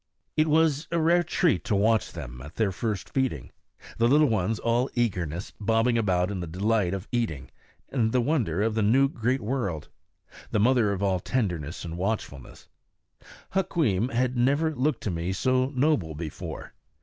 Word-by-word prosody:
It 155 Hz, 0 st, +3 dB
was 155 Hz, -1 st, +2 dB
a 170 Hz, -, -1 dB
rare 170 Hz, +2 st, +4 dB
treat 175 Hz, -1 st, +1 dB
to 105 Hz, -, +1 dB
watch 110 Hz, +2 st, +2 dB
them 60 Hz, -7 st, -8 dB
at 75 Hz, +4 st, -11 dB
their 110 Hz, -3 st, +1 dB
first 105 Hz, 0 st, -3 dB
feeding, 130 Hz, -, -1 dB, 0.5 s
the 115 Hz, -, +4 dB
little 145 Hz, +3 st, +5 dB
ones 110 Hz, 0 st, 0 dB
all 120 Hz, +4 st, +1 dB
eagerness, 90 Hz, -7 st, -2 dB
bobbing 115 Hz, +3 st, +2 dB
about 95 Hz, -4 st, +1 dB
in 95 Hz, -, -3 dB
the 85 Hz, -, -4 dB
delight 95 Hz, +2 st, 0 dB
of 95 Hz, +2 st, -7 dB
eating 110 Hz, -, -2 dB, 0.4 s
and 115 Hz, -5 st, +1 dB
the 125 Hz, -, +2 dB
wonder 115 Hz, -, 0 dB
of 110 Hz, 0 st, +1 dB
the 110 Hz, -, 0 dB
new 125 Hz, +7 st, +4 dB
great 125 Hz, 0 st, -1 dB
world, 105 Hz, -, -3 dB, 0.6 s
the 105 Hz, -, 0 dB
mother 110 Hz, -3 st, +3 dB
all 95 Hz, -2 st, +1 dB
tenderness 90 Hz, -, -2 dB
and 85 Hz, +1 st, -6 dB
watchfulness. 95 Hz, -, -4 dB, 0.9 s
Hukweem 130 Hz, -, +1 dB
had 125 Hz, +1 st, 0 dB
never 140 Hz, +6 st, +2 dB
looked 135 Hz, -1 st, -1 dB
to 105 Hz, -, -1 dB
me 85 Hz, +2 st, -2 dB
so 130 Hz, +4 st, +1 dB
noble 125 Hz, -, +1 dB
before. 80 Hz, -1 st, -7 dB
115 Hz, 165 wpm, -26 LUFS, 90-130 Hz, 0.9 s, little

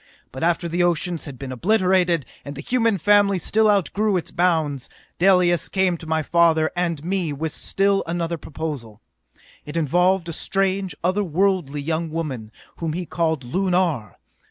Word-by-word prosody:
But 130 Hz, -, -8 dB
after 170 Hz, +1 st, +1 dB
the 170 Hz, +2 st, -1 dB
oceans 175 Hz, -1 st, 0 dB
had 140 Hz, -4 st, -8 dB
been 135 Hz, +1 st, -7 dB
obliterated, 180 Hz, -, +2 dB, 0.2 s
and 140 Hz, 0 st, -7 dB
the 140 Hz, -, -6 dB
human 230 Hz, -1 st, +1 dB
family 200 Hz, +2 st, +4 dB
still 215 Hz, +5 st, +2 dB
outgrew 205 Hz, 0 st, +1 dB
its 175 Hz, -, -5 dB
bounds, 160 Hz, -6 st, 0 dB, 0.3 s
Dalis 180 Hz, -3 st, +3 dB
came 190 Hz, -2 st, +1 dB
to 160 Hz, -, -10 dB
my 160 Hz, 0 st, 0 dB
father 160 Hz, 0 st, +3 dB
and 170 Hz, -4 st, -2 dB
me 180 Hz, -3 st, -1 dB
with 155 Hz, +2 st, -3 dB
still 195 Hz, +4 st, +1 dB
another 170 Hz, 0 st, -2 dB
proposal. 140 Hz, -9 st, -6 dB, 0.6 s
It 150 Hz, +3 st, -6 dB
involved 180 Hz, +4 st, +2 dB
a 165 Hz, -, -4 dB
strange, 195 Hz, +2 st, -1 dB
other 190 Hz, +4 st, +1 dB
worldly 175 Hz, -5 st, 0 dB
young 160 Hz, +2 st, -2 dB
woman 140 Hz, -9 st, -4 dB, 0.3 s
whom 165 Hz, -2 st, -3 dB
he 175 Hz, +2 st, -3 dB
called 160 Hz, -3 st, -1 dB
Lunar! 175 Hz, -, 0 dB
170 Hz, 155 wpm, -22 LUFS, 155-190 Hz, 0.6 s, family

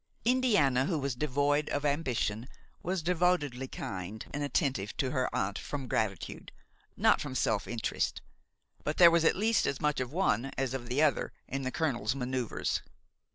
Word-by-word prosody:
Indiana, 205 Hz, -, +3 dB
who 170 Hz, -, 0 dB
was 140 Hz, -2 st, -1 dB
devoid 145 Hz, +2 st, +1 dB
of 145 Hz, +1 st, -1 dB
ambition, 130 Hz, -6 st, 0 dB, 0.3 s
was 180 Hz, -1 st, -2 dB
devotedly 165 Hz, -7 st, +1 dB
kind 100 Hz, -1 st, -6 dB
and 145 Hz, -, -2 dB
attentive 135 Hz, -, -1 dB
to 130 Hz, -2 st, 0 dB
her 130 Hz, -2 st, 0 dB
aunt 95 Hz, +1 st, -1 dB
from 140 Hz, -3 st, -5 dB
gratitude, 100 Hz, -7 st, -2 dB, 0.5 s
not -, -, +4 dB
from 140 Hz, -3 st, -5 dB
self 110 Hz, -4 st, +1 dB
interest; 115 Hz, -1 st, -1 dB, 0.6 s
but 150 Hz, -, -2 dB
there 170 Hz, -2 st, +9 dB
was 170 Hz, -1 st, +3 dB
at -, -, +4 dB
least 220 Hz, +3 st, +2 dB
as 140 Hz, -, -1 dB
much 150 Hz, -2 st, +1 dB
of 130 Hz, -1 st, -3 dB
one 150 Hz, -, +1 dB
as 135 Hz, -2 st, -1 dB
of 120 Hz, -2 st, -5 dB
the 135 Hz, +5 st, +2 dB
other 150 Hz, -, +2 dB, 0.2 s
in 135 Hz, -, -3 dB
the 130 Hz, -1 st, -2 dB
colonel's 130 Hz, -8 st, 0 dB
manoeuvres. 125 Hz, -2 st, -2 dB
135 Hz, 165 wpm, -31 LUFS, 125-155 Hz, 0.6 s, there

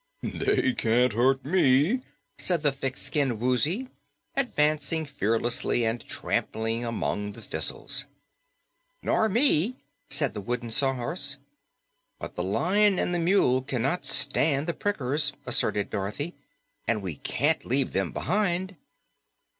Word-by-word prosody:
"They 395 Hz, -10 st, +1 dB
can't 120 Hz, -, +2 dB
hurt 130 Hz, +4 st, +2 dB
ME," 155 Hz, -, +3 dB, 0.4 s
said 175 Hz, -4 st, +1 dB
the 145 Hz, -, +3 dB
thick 135 Hz, -1 st, -4 dB
skinned 140 Hz, -5 st, -1 dB
Woozy, 145 Hz, -, +1 dB, 0.5 s
advancing 155 Hz, -, +1 dB
fearlessly 120 Hz, -3 st, 0 dB
and 115 Hz, +1 st, -1 dB
trampling 115 Hz, +1 st, -1 dB
among 105 Hz, -3 st, -2 dB
the -, -, -12 dB
thistles. -, -, -1 dB, 1.0 s
"Nor 220 Hz, -, +2 dB
me," 230 Hz, -, +3 dB, 0.3 s
said 140 Hz, -1 st, +1 dB
the 105 Hz, -, -5 dB
Wooden 120 Hz, +2 st, -3 dB
Sawhorse. 135 Hz, +3 st, +1 dB, 0.8 s
"But -, -, -8 dB
the -, -, -2 dB
Lion 185 Hz, -, +2 dB
and 175 Hz, -, 0 dB
the 175 Hz, -, +1 dB
Mule 165 Hz, -8 st, +3 dB
cannot 135 Hz, +5 st, -1 dB
stand 140 Hz, +2 st, +2 dB
the 170 Hz, -, -1 dB
prickers," 150 Hz, -7 st, 0 dB
asserted 105 Hz, -1 st, +1 dB
Dorothy, 105 Hz, -, -3 dB, 0.5 s
"and 110 Hz, -3 st, 0 dB
we 85 Hz, -6 st, -5 dB
can't -, -, 0 dB
leave 130 Hz, +1 st, 0 dB
them 95 Hz, -3 st, 0 dB
behind." 185 Hz, 0 st, -1 dB
140 Hz, 120 wpm, -27 LUFS, 120-175 Hz, 1.0 s, ME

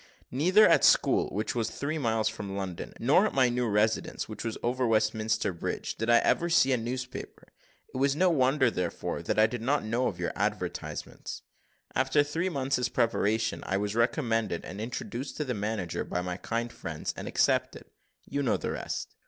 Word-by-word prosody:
Neither 185 Hz, -, +5 dB
at -, -, +5 dB
the -, -, +7 dB
school, -, -, +3 dB
which 105 Hz, +3 st, -2 dB
was 115 Hz, -2 st, -1 dB
three 155 Hz, +3 st, -3 dB
miles 110 Hz, -4 st, +1 dB
from 105 Hz, -3 st, -4 dB
London, 95 Hz, -3 st, -5 dB
nor -, -, +4 dB
at -, -, -6 dB
my 130 Hz, -2 st, +4 dB
new 120 Hz, 0 st, 0 dB
residence, 105 Hz, +1 st, 0 dB
which 110 Hz, -1 st, -7 dB
was 115 Hz, -1 st, -3 dB
over 125 Hz, +1 st, +1 dB
Westminster 110 Hz, -2 st, +1 dB
bridge, 85 Hz, -, -3 dB
did 115 Hz, +1 st, -3 dB
I 120 Hz, -, +7 dB
ever 170 Hz, -, +2 dB
see 135 Hz, -5 st, +4 dB
a 130 Hz, -, +3 dB
newspaper; 125 Hz, +2 st, -6 dB, 0.4 s
it -, -, -4 dB
was 140 Hz, +1 st, +2 dB
no 180 Hz, +3 st, +3 dB
wonder, 130 Hz, -3 st, +3 dB
therefore, 90 Hz, -4 st, -3 dB
that -, -, -2 dB
I 110 Hz, -, +7 dB
did 115 Hz, +1 st, -3 dB
not 135 Hz, +1 st, +1 dB
know 120 Hz, +4 st, +1 dB
of -, -, -3 dB
your -, -, -2 dB
advertisements. -, -, -4 dB, 0.5 s
After 130 Hz, +3 st, +3 dB
three 165 Hz, +5 st, -1 dB
months' 135 Hz, -5 st, 0 dB
preparation 110 Hz, -2 st, +1 dB
I 95 Hz, -, -1 dB
was 100 Hz, 0 st, -2 dB
recommended 115 Hz, -, 0 dB
and 100 Hz, +3 st, -7 dB
introduced 120 Hz, +3 st, -5 dB
to 150 Hz, -, -1 dB
the 125 Hz, -, -2 dB
manager 105 Hz, -5 st, -2 dB
by 90 Hz, -, -2 dB
my 90 Hz, 0 st, -3 dB
kind 115 Hz, +4 st, -3 dB
friends, 80 Hz, -2 st, -5 dB
and -, -, -6 dB
accepted. -, -, +1 dB, 0.4 s
You 140 Hz, +1 st, -2 dB
know 135 Hz, -, +2 dB
the -, -, -3 dB
rest." -, -, -4 dB
115 Hz, 190 wpm, -29 LUFS, 110-130 Hz, 0.5 s, the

